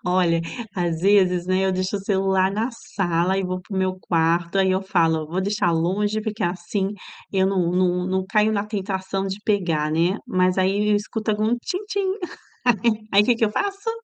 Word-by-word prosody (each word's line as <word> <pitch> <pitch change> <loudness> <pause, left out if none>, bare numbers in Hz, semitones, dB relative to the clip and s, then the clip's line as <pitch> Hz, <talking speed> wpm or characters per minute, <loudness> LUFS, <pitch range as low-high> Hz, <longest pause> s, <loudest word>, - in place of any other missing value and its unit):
olha, 180 -2 +2 0.3
às 170 -3 -1
vezes, 185 -2 +3
né, 185 +1 +1
eu 190 - +1
deixo 185 +2 -1
o - - -3
celular 190 -1 +1
na 220 +5 -1
sala 185 -5 -1
e 195 - 0
vou 185 0 -3
para 195 +2 -9
o - - +1
meu 185 0 -1
quarto 170 +1 +1
aí 190 -1 +3
eu 185 0 +1
falo: 165 -5 +1
"Vou 180 +4 -2
deixar 205 -2 +1
longe, 205 +6 0
porque 215 -1 -4
assim 180 +3 -1 0.4
eu 190 -1 +3
não 185 -3 +1
não 180 0 +1
não 190 0 0
caio 210 +2 +2
na 205 -1 0
tentação 195 -2 -3
de 195 +1 -4
pegar, 170 -8 +1
né", 170 +4 +2
mas 185 0 +1
aí 195 +2 +1
eu - - +4
escuto 215 +1 -2
com 215 +3 +1
tin-tin 395 - -2 0.8
e 215 0 -15
aí 200 +1 +6
que 245 - +4
que 230 - +1
eu 210 - +1
faço? 400 - -2
190 Hz, 195 wpm, -23 LUFS, 180-210 Hz, 0.8 s, aí